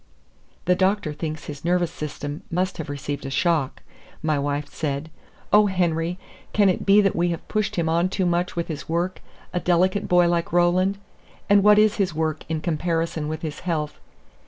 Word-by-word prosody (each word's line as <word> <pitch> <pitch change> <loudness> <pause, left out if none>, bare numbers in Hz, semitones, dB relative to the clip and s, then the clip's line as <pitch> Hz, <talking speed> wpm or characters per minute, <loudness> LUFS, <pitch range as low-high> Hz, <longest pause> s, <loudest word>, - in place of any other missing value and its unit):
"The 180 - +4
doctor 190 -3 +1
thinks 155 0 -5
his 145 -1 -8
nervous 175 0 +1
system 145 0 -6
must 185 +1 -1
have 150 - -5
received 145 0 -4
a 135 - -4
shock," 150 0 0 0.4
my 155 -2 +1
wife 145 +1 -2
said. 145 +1 -4 0.4
"Oh, 210 0 +7
Henry, 175 -2 0 0.4
can 205 -2 +4
it 185 - -1
be 200 +1 +7
that 195 -2 +1
we 175 +1 +2
have 170 -1 -4
pushed 210 -1 -1
him 170 -2 0
on 170 +3 +2
too 190 0 -1
much 175 +1 0
with 170 -1 -2
his 155 -2 -6
work 175 +3 -1 0.3
a 180 - +1
delicate 185 +3 +2
boy 180 -1 +5
like 170 -1 0
Roland? 180 +3 +3 0.5
And 200 0 +7
what 210 0 +7
is 215 0 +4
his 190 -6 0
work 155 -1 -1
in 160 -1 -1
comparison 165 -1 -1
with 155 +1 -5
his 155 -2 -4
health? 155 -4 -3
170 Hz, 185 wpm, -24 LUFS, 155-185 Hz, 0.5 s, Oh